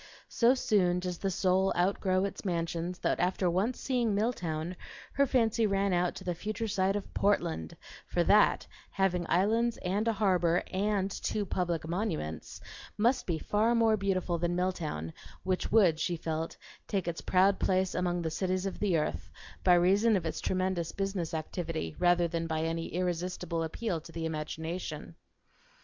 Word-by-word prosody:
So 240 +2 +4
soon 185 -8 +2
does 180 -1 -4
the 195 - -1
soul 190 +1 +2
outgrow 185 +1 +1
its 200 - -6
mansions 170 -1 -2
that - - 0
after 180 +1 +1
once 205 +8 0
seeing 240 -5 0
Milltown 180 -6 -2 0.4
her 280 +1 +3
fancy 230 -3 +2
ran 195 -1 +1
out 175 0 +1
to - - -8
the 180 - -1
future 215 +5 -4
sight 195 -1 +1
of 205 - -5
Portland; 80 - 0 0.3
for - - +1
that, - - +4 0.2
having 180 -3 0
islands 225 +6 +2
and 200 +5 0
a 230 - +3
harbor 180 -4 +2
and 200 0 0
two 205 +1 -2
public 175 -4 -2
monuments, 165 - -3 0.4
must 245 +4 +2
be 170 -3 0
far 215 +7 +1
more 225 -1 +4
beautiful 185 -4 -1
than 175 +1 0
Milltown, 160 - -2 0.3
which 185 -1 -1
would, 185 -8 +5
she 175 0 -1
felt, 160 0 -3 0.3
take 195 -5 -1
its 170 -1 -3
proud 190 +2 +3
place 185 0 +1
among 175 -1 -1
the 160 - -2
cities 185 +3 -1
of 195 - -4
the 190 -5 +2
earth, 155 0 -2 0.3
by 180 -1 +6
reason 200 +6 +4
of 175 - -4
its 160 - -3
tremendous 185 -3 -1
business 195 -4 -2
activity 160 - -4
rather 175 -1 +4
than 165 0 -3
by 160 -1 -1
any 165 +1 -2
irresistible 175 -1 -2
appeal 165 +2 -2
to 165 - -13
the 165 0 -4
imagination. 160 +2 -5
185 Hz, 165 wpm, -30 LUFS, 170-200 Hz, 0.4 s, by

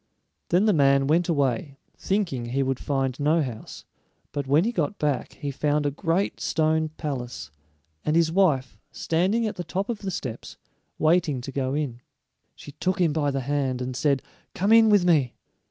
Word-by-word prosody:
Then 180 +5 +3
the 215 - +4
man 140 -3 +4
went 165 +5 +2
away, 140 -2 0 0.2
thinking 185 - -1
he 130 +3 0
would 130 -1 -1
find 135 -2 -1
no 155 +3 +2
house, 120 -5 -8 0.5
but 140 -2 -4
when 145 +5 +4
he 230 - 0
got 190 -1 -2
back 145 -5 -1
he 145 - -5
found 145 +2 0
a 145 - +1
great 170 +6 -1
stone 160 0 +1
palace, 130 -6 -5 0.5
and 155 - 0
his 165 -1 +3
wife 140 - +1
standing 190 +8 0
at 215 - -3
the 175 - -3
top 195 +4 -3
of 230 -3 -2
the 195 - -4
steps, 130 -10 -6 0.4
waiting 160 -3 +2
to 135 - -7
go 135 0 -2
in. 135 -5 -3 0.5
She 145 - -11
took 185 +6 -2
him 165 -4 +2
by 145 -2 +1
the 135 -1 -2
hand 135 -1 -1
and 125 0 -4
said, 140 0 +1 0.3
"Come 200 +4 +2
in 225 -1 +7
with 205 -4 +4
me." 150 -8 +2
150 Hz, 185 wpm, -25 LUFS, 135-175 Hz, 0.5 s, in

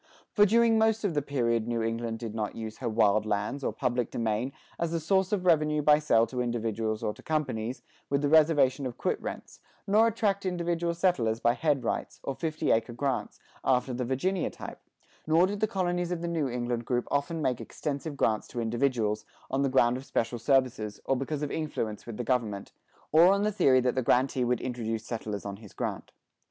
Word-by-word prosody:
For 205 -1 +5
during 230 +1 +4
most 220 0 +2
of 200 -5 0
the 145 - +1
period 120 -5 0
New 115 -1 -1
England 115 0 -2
did 115 -2 -6
not 110 -2 -3
use 110 -1 -6
her 125 - -2
wild 110 -1 +3
lands, 105 +7 -2
or - - 0
public 125 -2 -1
domain, 115 +3 -1 0.3
as 170 -1 -1
a 165 - 0
source 190 +3 +1
of 195 -3 0
revenue 150 -3 +3
by 150 0 +6
sale 115 -7 +3
to 125 +2 -3
individuals 115 -2 -2
or 105 - -1
to - - -15
companies, 130 -6 -2 0.3
with 140 +1 0
the - - +3
reservation 145 -3 +4
of 120 - -8
quit - - -1
rents; - - -7 0.3
nor 215 +3 +4
attract 205 -3 0
individual 170 -2 -1
settlers 125 -12 +1
by 120 0 +3
"head 145 0 0
rights," - - -3
or 135 - -2
fifty 155 +3 -1
acre 115 +1 +1
grants, 135 +1 -2 0.2
after 130 0 +1
the 125 +1 -2
Virginia 150 +10 0
type; - - -9 0.5
nor 165 +3 +5
did 200 +2 -3
the 215 - +2
colonies 175 -3 -1
of 175 -2 -2
the - - -1
New 160 -5 -1
England 120 -1 -2
group 125 0 -1
often 145 +4 0
make 125 -5 0
extensive 145 0 -5
grants 110 -4 +1
to 125 - -6
individuals, 115 -2 0 0.3
on 135 +1 +1
the 140 - +2
ground 125 -2 +3
of 130 - -8
special 115 -1 -1
services, 125 -5 +1
or 135 - +2
because 140 +3 -3
of 145 - -2
influence 115 -10 -3
with 115 -3 -6
the 125 - -2
government, 115 -5 -1 0.4
or 165 +3 +7
on 200 +1 +2
the 210 - +1
theory 135 -10 +4
that 125 0 +1
the 130 - 0
grantee 125 +1 +2
would 125 0 0
introduce 115 -3 -3
settlers 110 -4 -5
on 100 -1 -5
his 105 -2 -14
grant. - - -4
130 Hz, 205 wpm, -28 LUFS, 115-160 Hz, 0.5 s, or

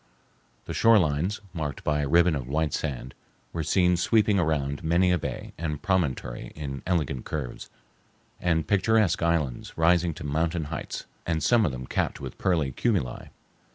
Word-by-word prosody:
The - - -5
shorelines, 95 -3 +3
marked 75 -4 -4
by 75 -1 +1
a 70 - -1
ribbon 85 +1 +5
of 65 -4 -4
white 75 +1 0
sand, 65 -2 -3 0.4
were 85 - -2
seen 90 +3 +3
sweeping 105 +2 +3
around 75 -3 0
many 85 +3 +3
a 90 - +3
bay 65 -4 -5
and 75 -3 -2
promontory 75 -10 -1
in 70 -3 -5
elegant 75 -8 0
curves, 70 -6 -5 0.7
and 80 -3 +1
picturesque 105 -2 +3
islands 85 -7 -1
rising 85 0 +3
to - - -8
mountain 80 +3 0
heights, - - -5 0.2
and 80 -2 0
some 115 +4 +4
of - - -1
them 65 0 -6
capped - - -1
with - - -8
pearly 80 -7 +1
cumuli. 85 - -1
80 Hz, 155 wpm, -26 LUFS, 70-90 Hz, 0.7 s, ribbon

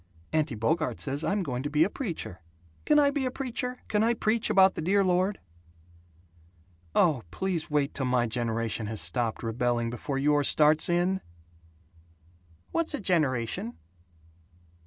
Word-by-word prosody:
Auntie 155 -5 +1
Bogart 155 +9 -1
says 140 +2 -2
I'm 200 -1 0
going 125 -6 -3
to 145 - -3
be 150 +1 +3
a 180 - +1
preacher. 170 - -5 0.4
Can 300 - +4
I 285 -1 +5
be 280 -2 -1
a - - 0
preacher? 250 -1 -4
Can 210 - +1
I 235 +1 +2
preach 220 0 0
about 190 0 +5
the - - -5
Dear 195 +5 +2
Lord?" 185 +2 +1 1.6
"Oh, 150 -8 +3
please 175 - -3
wait 145 -2 0
till 135 -2 -2
my 125 -1 +2
generation 115 -1 -2
has 110 -1 -3
stopped 110 +9 -1
rebelling 120 0 -1
before 135 +3 -4
yours 145 0 +2
starts 155 +2 +4
in!" 180 +2 +1 1.5
"What's 330 -2 0
a - - -5
generation?" 130 - -1
155 Hz, 150 wpm, -28 LUFS, 120-195 Hz, 1.6 s, I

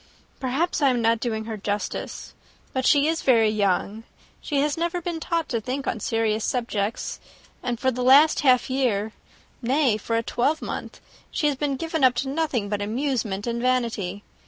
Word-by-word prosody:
Perhaps 275 +7 -1
I 280 - +5
am 250 -2 +1
not 230 0 +2
doing 220 -2 -2
her 220 -1 -5
justice. 205 +1 -4 0.4
But 260 -1 0
she 290 -1 +5
is 325 0 0
very 225 -4 +4
young: 205 +1 0 0.4
she 290 -3 -1
has 295 0 +1
never 340 +1 -1
been 345 -1 -4
taught 335 0 -1
to 230 -3 -1
think 260 +4 -3
on 225 - -2
serious 220 0 0
subjects; 230 -4 -2 0.4
and 245 -2 -3
for 260 - +2
the 250 0 -4
last 280 +5 +6
half 255 -4 +4
year, 235 -6 0 0.5
nay, 255 -2 +2
for 230 +2 -3
a 230 - 0
twelvemonth, 285 +8 -2 0.3
she 310 - -2
has 295 -1 +2
been 280 0 -1
given 320 +1 -2
up 255 -1 +5
to 265 +2 -2
nothing 275 -8 -1
but 205 0 -2
amusement 220 -3 -2
and 235 0 -2
vanity. 230 -6 -1
250 Hz, 180 wpm, -24 LUFS, 220-280 Hz, 0.5 s, last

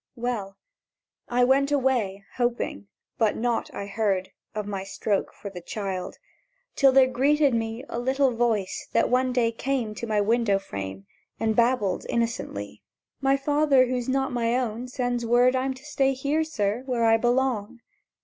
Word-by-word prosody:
—Well, 230 -5 -3 0.7
I 245 +1 +2
went 275 +3 +3
away, 240 -8 0
hoping; 240 - -1 0.3
but 220 -3 +2
nought 240 0 -1
I 200 - -5
heard 195 -2 -1 0.2
Of 210 -1 -2
my 200 -2 -4
stroke 200 +1 -2
for 200 - -9
the 180 -2 -8
child, 190 0 -4 0.6
till 270 -1 +5
there 265 0 +6
greeted 275 +2 +2
me 225 +1 -2
A 235 - -4
little 265 +2 +2
voice 230 -5 -1
that - - +2
one 255 0 +2
day 240 -2 +2
came 240 -2 -2
To 230 +2 -6
my 215 -1 +1
window 220 -1 +2
frame 95 - -6 0.3
And 220 -1 +1
babbled 235 -5 +1
innocently: 230 - -3 0.4
"My 275 0 +3
father 290 -1 +3
who's 250 0 -2
not 265 0 0
my 235 0 +1
own, 245 -1 -3
sends 245 -1 -2
word 245 +2 +4
I'm 260 +1 -1
to 265 +3 -15
stay 270 -3 +1
here, 280 +4 0
sir, 215 -7 -1
where 240 -3 +1
I 225 0 +5
belong!" 240 -1 0
240 Hz, 160 wpm, -26 LUFS, 210-260 Hz, 0.7 s, there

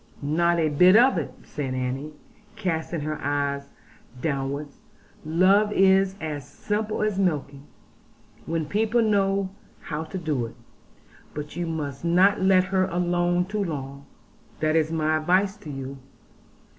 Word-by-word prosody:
'' - - -26
'Not 170 +4 +2
a 160 -1 +2
bit 180 +6 +6
of 240 -4 +5
it,' 145 - -5
said 135 -3 -4
Annie, 130 +4 -3 0.4
casting 170 -5 -2
her 155 +1 -3
bright - - -12 0.3
eyes 140 0 -9 0.5
downwards: 140 0 -3 0.4
'love 190 +6 +3
is 195 -1 +4
as 150 -3 -4
simple 215 0 -2
as 210 -2 0
milking, 145 -6 -1 0.8
when 165 -1 -1
people 220 +7 +1
know 195 -2 +1 0.3
how 155 0 -4
to 185 - -6
do 150 -9 -1
it. 115 - -13 0.8
But 150 0 -6
you 175 -1 -2
must 145 -4 -4
not 185 +4 +4
let 190 -1 +5
her 185 0 +1
alone 175 0 +1
too 205 +2 -2
long; 140 -4 -6 0.5
that 155 0 +1
is 160 -1 +2
my 155 -1 +1
advice 185 +5 +2
to 155 - -11
you. 135 -1 -6
165 Hz, 145 wpm, -25 LUFS, 150-190 Hz, 0.8 s, bit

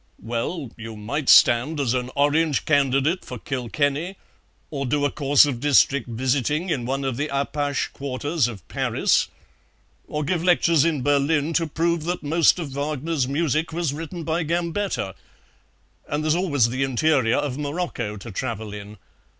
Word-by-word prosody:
"Well, 120 +4 -3
you 110 -1 -8
might 135 +7 -3
stand 125 +6 +5
as 130 -4 +1
an 125 -1 -2
Orange 145 +1 +2
candidate 140 +3 +2
for 125 - -7
Kilkenny, 145 - -2 0.5
or 140 -3 -3
do 145 +3 +1
a 145 - +1
course 145 0 +4
of 135 -5 -3
district 140 -1 +3
visiting 135 +8 0
in 125 -6 -1
one 135 +1 -2
of 130 -3 -2
the 145 +2 -1
Apache 140 +1 -1
quarters 140 +1 -1
of 105 -8 -9
Paris, - - +1 0.8
or 150 0 -3
give 165 +3 -1
lectures 170 -4 +4
in 155 -6 0
Berlin 145 +3 +1
to 165 0 +1
prove 165 +1 -1
that 175 -1 -3
most 160 +4 +3
of 165 -5 -4
Wagner's 145 0 -2
music 155 +2 0
was 165 -3 -1
written 165 +3 -6
by 160 +2 -1
Gambetta; 170 - -2 1.0
and 145 +1 -1
there's 155 0 +2
always 145 -9 +2
the 130 +3 -3
interior 135 -2 +2
of 140 -1 -2
Morocco 145 -8 -3
to 105 +3 -9
travel 110 -1 -4
in. 105 +1 -9
145 Hz, 160 wpm, -23 LUFS, 130-160 Hz, 1.0 s, stand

